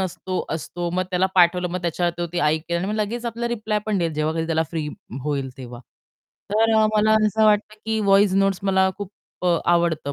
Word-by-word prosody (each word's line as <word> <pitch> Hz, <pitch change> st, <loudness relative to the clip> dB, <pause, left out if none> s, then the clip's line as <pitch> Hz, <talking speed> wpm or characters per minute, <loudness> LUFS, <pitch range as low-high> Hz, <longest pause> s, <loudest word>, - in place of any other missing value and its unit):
नसतो, 185 Hz, 0 st, -3 dB
असतो. 175 Hz, +2 st, -4 dB
मग 185 Hz, +1 st, 0 dB
त्याला 185 Hz, +1 st, +2 dB
पाठवलं, 180 Hz, 0 st, +4 dB
मग 180 Hz, 0 st, -4 dB
त्याच्यावर 175 Hz, +1 st, 0 dB
ते-ते 175 Hz, 0 st, -3 dB
ऐकेल 160 Hz, +3 st, 0 dB
आणि 185 Hz, -, -3 dB
मग 210 Hz, -, -2 dB
लगेच 220 Hz, +3 st, -2 dB
आपल्याला 235 Hz, +1 st, -3 dB
रिप्लाय 215 Hz, -1 st, -2 dB
पण 210 Hz, -3 st, 0 dB
देईल, 165 Hz, -2 st, -1 dB
जेव्हा 155 Hz, +1 st, -1 dB
कधी 165 Hz, 0 st, -2 dB
त्याला 160 Hz, -1 st, +1 dB
फ्री 155 Hz, -3 st, -3 dB, 0.4 s
होईल 140 Hz, -3 st, -2 dB
तेव्हा. 125 Hz, -2 st, -9 dB, 0.7 s
तर 225 Hz, +1 st, +3 dB
अ, 220 Hz, -, +5 dB
मला 215 Hz, +1 st, +4 dB
असं 220 Hz, +1 st, +2 dB
वाटतं 210 Hz, 0 st, +2 dB
की 220 Hz, 0 st, -1 dB
व्हॉईस 200 Hz, -1 st, +4 dB
नोटस 195 Hz, -1 st, +2 dB
मला 190 Hz, -1 st, +2 dB
खूप 205 Hz, -1 st, -7 dB, 0.5 s
आवडतं 170 Hz, -4 st, +1 dB
185 Hz, 195 wpm, -22 LUFS, 165-210 Hz, 0.7 s, अ